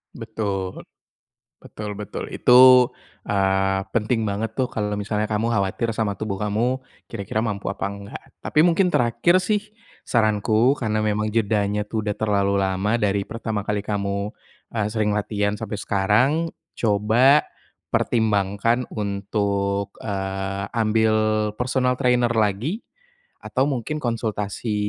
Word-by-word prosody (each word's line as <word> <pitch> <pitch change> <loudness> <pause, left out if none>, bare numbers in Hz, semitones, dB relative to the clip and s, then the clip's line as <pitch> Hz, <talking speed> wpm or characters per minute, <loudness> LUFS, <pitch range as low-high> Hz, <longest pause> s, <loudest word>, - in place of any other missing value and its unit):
Betul, 105 -5 -4 0.8
betul 105 -1 -7
betul. 105 -1 -6
Itu, 125 0 +7 0.4
eee, 95 -1 +2
penting 115 0 0
banget 110 +2 -3
tuh 130 - +2
kalau 105 -1 -2
misalnya 105 +1 -2
kamu 110 +2 0
khawatir 105 +2 0
sama 105 -2 -1
tubuh 100 -3 -4
kamu, 115 +5 0 0.2
kira-kira 110 0 -3
mampu 100 -3 -3
apa - - -4
enggak. 100 0 -9 0.2
Tapi 150 - +2
mungkin 180 +2 +3
terakhir 175 +6 +2
sih, 210 +1 +1 0.5
saranku, 110 +2 +3
karena 110 -2 -1
memang 105 0 0
jedanya 105 -1 0
tuh 110 +1 -3
sudah 105 -1 -3
terlalu 100 -2 +1
lama 95 +3 +1
dari 100 -3 0
pertama 110 -2 -3
kali 105 0 -2
kamu, 100 0 -2 0.4
eee, 110 -3 0
sering 105 -1 0
latihan 105 0 -1
sampai 110 -1 -4
sekarang, 105 +6 +2 0.4
coba 115 +7 +3 0.5
pertimbangkan 110 +2 +1
untuk, 100 -1 -2
eee, 95 -1 -3
ambil 110 -1 +2 0.5
personal 125 0 +1
trainer 125 -2 +3
lagi, 115 - 0 0.6
atau 130 - -1
mungkin 145 +2 -2
konsultasi 110 -2 -2
105 Hz, 125 wpm, -23 LUFS, 100-115 Hz, 0.8 s, Itu